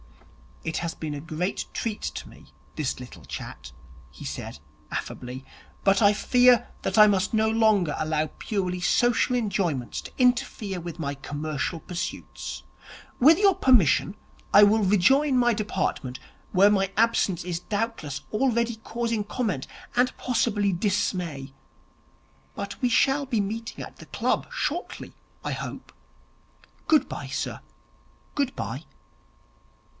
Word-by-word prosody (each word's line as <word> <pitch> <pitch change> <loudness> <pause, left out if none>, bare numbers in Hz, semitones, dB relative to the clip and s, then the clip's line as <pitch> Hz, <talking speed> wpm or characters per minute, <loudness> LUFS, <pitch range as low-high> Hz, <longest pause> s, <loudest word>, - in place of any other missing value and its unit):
'It 160 - -2
has 170 -1 -3
been 155 -2 -4
a 145 - -4
great 165 +4 -3
treat 220 -2 -3
to - - -5
me, - - -16 0.3
this 150 -5 -2
little 125 -1 -11
chat,' 65 0 -8 0.4
he 65 - -11
said - - -5 0.3
affably, 130 +1 -5 0.4
'but 195 +1 +4
I 205 -1 +6
fear 245 +2 +4
that - - -2
I 210 - +11
must 205 +1 +2
no 220 0 +3
longer 215 -8 +3
allow 155 0 0
purely 185 -4 -2
social 240 +7 +2
enjoyments 195 - -1
to - - -10
interfere 240 -6 +1
with 170 0 -7
my 140 -3 -2
commercial 145 +3 -3
pursuits. 175 +1 -6 0.6
With 310 +6 +7
your 400 -1 +6
permission, 205 - +4 0.4
I 205 - +9
will 210 +1 +5
rejoin 255 +9 +4
my 240 -1 +4
department, 190 - -2 0.3
where 195 +2 +6
my 195 -1 +1
absence 215 -5 +2
is 175 -1 -3
doubtless 205 - -3
already 235 0 +1
causing 230 0 -2
comment 205 - -2 0.3
and 250 +1 +2
possibly 210 -5 +1
dismay. 175 -8 -1 1.0
But 200 0 -5
we 250 - +3
shall 270 +4 +3
be 235 -5 +1
meeting 225 +3 -4
at - - -11
the - - -13
club - - 0
shortly, - - -3 0.3
I - - -2
hope. - - -6 1.0
Good 310 -2 +4
bye, - - -5
sir, - - -4 0.7
good 280 -3 0
bye.' - - -5
205 Hz, 135 wpm, -26 LUFS, 170-235 Hz, 1.0 s, I